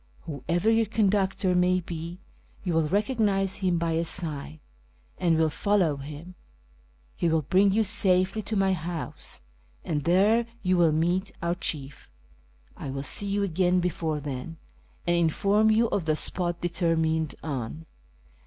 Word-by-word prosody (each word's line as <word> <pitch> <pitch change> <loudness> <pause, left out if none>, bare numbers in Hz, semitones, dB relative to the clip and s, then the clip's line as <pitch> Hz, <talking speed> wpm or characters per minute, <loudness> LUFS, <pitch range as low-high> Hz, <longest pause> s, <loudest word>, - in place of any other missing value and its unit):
AVhoever 165 - 0
yuur 225 -2 +2
conductor 195 -3 +1
may 180 +1 +3
be, 170 0 -6 0.5
you 180 -3 -1
will 160 -1 +2
lecognise 200 - +1
him 185 -3 +1
l>y 165 0 -1
a - - +1
sign, 155 -3 -2 0.6
and 170 -2 +2
will 160 0 +3
follow 185 -6 +1
liiiii: 150 +5 -9 0.8
he 170 - 0
will 160 -1 +1
bring 190 +7 +3
you 220 +3 +3
safely 190 -1 +2
to 220 - -4
my 195 -1 +2
house, 170 - -5 0.4
and 150 -3 -2
there 210 +7 +3 0.2
you 185 -1 +2
Mill 170 -2 +4
meet 175 +5 0
our 170 0 +1
chief. 145 - -5 0.7
I - - -7
will 135 +1 -4
see 200 +7 0
you 200 0 0
again 180 0 +2
before 165 -3 -1
then, 145 +3 -6 0.5
and 175 - +2
inform 200 +6 +3
you 225 +2 +4
of 185 - -1
the 155 -1 +2
spot 175 +2 0
determined 160 -3 0
on. 145 +1 -5
175 Hz, 150 wpm, -27 LUFS, 160-195 Hz, 0.8 s, Mill